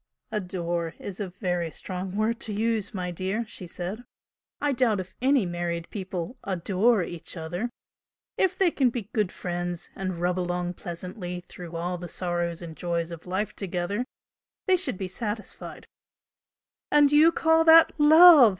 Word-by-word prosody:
"'Adore' 175 -4 -2
is 195 -2 -7
a 200 -3 -3
very 175 -2 -2
strong 185 +3 -5
word 220 +2 0
to 220 - -2
use, 220 -1 0
my 180 -2 -3
dear!" 190 +6 -2
she 185 -4 -7
said 185 +7 -5 0.6
"I 290 - +1
doubt 240 -6 +2
if 185 0 -7
any 265 -4 +3
married 175 -1 -3
people 190 +2 -5
'adore' 195 +3 +2
each 170 +1 -6
other! 175 +8 -3 0.7
If 375 -1 +1
they 375 -3 +4
can 265 -5 +3
be 230 -3 -6
good 210 -5 +1
friends 175 -1 -4
and 185 -2 -3
rub 180 +1 0
along 175 0 -2
pleasantly 180 +1 -6
through 175 -2 -9
all 175 +1 -2
the 175 0 -7
sorrows 175 -1 -2
and 165 -2 -8
joys 170 -1 -2
of 170 +1 -9
life 205 +3 -2
together, 195 +3 -2 0.6
they 375 - +5
should 365 - -1
be 190 - -3
satisfied." 210 +2 -6 1.0
"And 290 -1 +5
you 305 +3 +7
call 320 0 +3
that 325 0 +8
LOVE!" 310 -3 +9
185 Hz, 160 wpm, -26 LUFS, 175-230 Hz, 1.0 s, LOVE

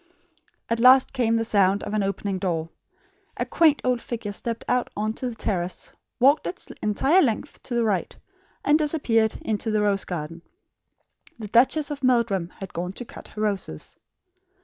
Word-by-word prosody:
At 230 0 -1
last 255 +2 +6
came 235 -4 +1
the 225 0 0
sound 200 -2 +2
of - - -5
an 215 - +1
opening 195 0 -2
door. 165 -3 -2 0.7
A - - -1
quaint 315 -3 +3
old 250 -2 +1
figure 225 -4 -5
stepped 230 +3 -5
out 250 0 +1
on 215 +1 -1
to 250 +2 -4
the 235 - -8
terrace, 180 -5 -3 0.3
walked 275 +4 +4
its 365 - -5 0.2
entire 270 - +3
length 255 +1 -1
to 245 - -5
the 235 - +2
right, 205 -5 -1 0.5
and 295 +2 +4
disappeared 245 -8 +1
into 220 +1 -2
the 215 -1 +1
rose 200 -1 +1
garden. 165 -1 -5 1.0
The 215 -3 -7
Duchess 280 +7 +3
of 285 - -5
Meldrum 235 -8 +2
had 195 -2 -8
gone 180 +2 -4
to 245 - -7
cut - - -11
her 215 - -5
roses. 205 -3 -3
225 Hz, 170 wpm, -24 LUFS, 195-250 Hz, 1.0 s, last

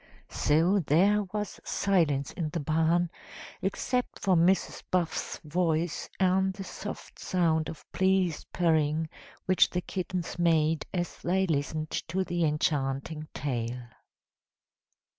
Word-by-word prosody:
So 170 +7 +3
there 190 +6 +4
was 210 0 -4
silence 155 -9 +1
in 160 -3 -3
the 165 - -3
barn, 165 +3 +2 0.5
except 245 +6 -1
for 190 -2 +2
Mrs. 175 +3 +2
Buff's 175 -3 -1
voice 165 0 0
and 190 0 +2
the 195 - -6
soft - - -8
sound 160 -3 +1
of 160 - -9
pleased 190 -3 +1
purring 160 -2 +2 0.4
which 185 0 +4
the 180 - -2
kittens 180 -2 -4
made 160 -2 +2
as 175 -2 -3
they 190 +2 +2
listened 155 -1 -1
to 185 +3 -1
the 175 -2 -1
enchanting 150 0 -1
tale. 120 -3 -3
170 Hz, 120 wpm, -29 LUFS, 155-185 Hz, 0.5 s, there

